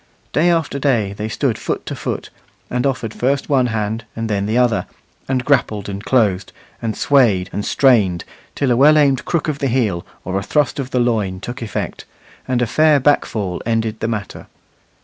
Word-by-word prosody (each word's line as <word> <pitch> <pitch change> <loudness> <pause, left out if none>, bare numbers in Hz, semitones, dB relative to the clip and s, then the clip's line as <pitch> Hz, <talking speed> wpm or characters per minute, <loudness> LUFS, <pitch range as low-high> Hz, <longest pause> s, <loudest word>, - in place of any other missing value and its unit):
Day 160 +5 +3
after 165 -5 0
day 115 -8 +1
they 105 +2 -4
stood - - -1
foot - - -3
to - - -4
foot, - - -4 0.4
and 125 +2 +1
offered 120 -5 -2
first 135 +4 -1
one 130 -3 +3
hand 110 0 -2
and 115 0 -3
then 100 -2 -1
the 110 +3 0
other, 125 -3 +2 0.4
and 130 -1 -1
grappled 110 -8 +1
and 100 0 -5
closed, 105 -8 +1 0.3
and 110 -2 -3
swayed 110 -10 +3
and 105 - -2
strained, 105 -12 +3 0.3
till 140 -3 +1
a - - +4
well 150 +5 +6
aimed 140 -3 +3
crook 170 -3 -1
of 150 -2 -2
the 140 - 0
heel 115 -9 0 0.2
or 95 +2 -1
thrust 145 +7 0
of 135 -2 -3
the 130 - 0
loin 110 -6 0
took 120 +6 -7
effect, 115 - -4 0.4
and 125 -1 +1
a - - +2
fair 155 +5 +4
back 145 +2 +3
fall 95 -5 -4
ended 115 -1 -1
the 110 - -1
matter. 110 -4 -5
120 Hz, 190 wpm, -19 LUFS, 105-135 Hz, 0.4 s, well